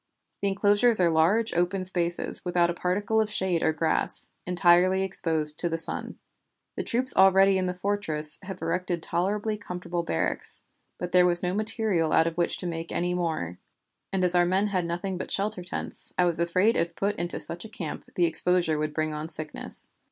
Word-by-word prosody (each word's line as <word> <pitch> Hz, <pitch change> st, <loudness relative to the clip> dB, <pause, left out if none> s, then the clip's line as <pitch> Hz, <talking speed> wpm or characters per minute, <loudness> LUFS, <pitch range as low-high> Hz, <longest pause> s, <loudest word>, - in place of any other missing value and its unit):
The 200 Hz, -, 0 dB
enclosures 205 Hz, +3 st, +3 dB
are 175 Hz, -2 st, +3 dB
large, 180 Hz, +8 st, +2 dB
open 180 Hz, +2 st, -1 dB
spaces, 175 Hz, -2 st, -1 dB
without 175 Hz, -1 st, +1 dB
a -, -, -4 dB
particle 200 Hz, +5 st, 0 dB
of 215 Hz, -, -2 dB
shade 190 Hz, -5 st, -1 dB
or 160 Hz, -, +2 dB
grass, 160 Hz, +1 st, +2 dB, 0.2 s
entirely 180 Hz, +1 st, +3 dB
exposed 160 Hz, -5 st, +2 dB
to 175 Hz, -, +1 dB
the 165 Hz, -, -2 dB
sun. 165 Hz, -, -3 dB, 0.6 s
The -, -, -3 dB
troops 255 Hz, +2 st, +2 dB
already 195 Hz, 0 st, +5 dB
in 185 Hz, -, -1 dB
the 180 Hz, -, -2 dB
fortress 170 Hz, -6 st, -2 dB
have 190 Hz, -3 st, -8 dB
erected 175 Hz, 0 st, -2 dB
tolerably 210 Hz, +4 st, -1 dB
comfortable 180 Hz, -3 st, -5 dB
barracks, 80 Hz, -, -3 dB, 0.3 s
but 180 Hz, 0 st, -5 dB
there 180 Hz, 0 st, +5 dB
was 175 Hz, 0 st, +2 dB
no 180 Hz, 0 st, -1 dB
material 210 Hz, -6 st, -1 dB
out 160 Hz, -, +4 dB
of 165 Hz, 0 st, -3 dB
which 175 Hz, 0 st, -1 dB
to -, -, -7 dB
make 165 Hz, -1 st, -5 dB
any 175 Hz, +1 st, -1 dB
more; 160 Hz, -, -3 dB, 0.5 s
and 190 Hz, -1 st, -1 dB
as 180 Hz, -1 st, +10 dB
our 175 Hz, 0 st, +4 dB
men 185 Hz, +3 st, +1 dB
had 185 Hz, -4 st, -1 dB
nothing 175 Hz, +2 st, -4 dB
but -, -, -6 dB
shelter 200 Hz, -2 st, -1 dB
tents, 180 Hz, -, -4 dB
I 180 Hz, -, +3 dB
was 170 Hz, -2 st, 0 dB
afraid 185 Hz, +6 st, +2 dB
if 170 Hz, 0 st, -1 dB
put 200 Hz, +1 st, -1 dB
into 175 Hz, 0 st, -3 dB
such 170 Hz, +1 st, -1 dB
a 220 Hz, -, -10 dB
camp 170 Hz, -7 st, -6 dB
the 175 Hz, -, +3 dB
exposure 165 Hz, -1 st, +1 dB
would 150 Hz, 0 st, -3 dB
bring 155 Hz, -1 st, -1 dB
on 150 Hz, +1 st, -5 dB
sickness. 155 Hz, -1 st, -4 dB
180 Hz, 195 wpm, -26 LUFS, 170-195 Hz, 0.6 s, as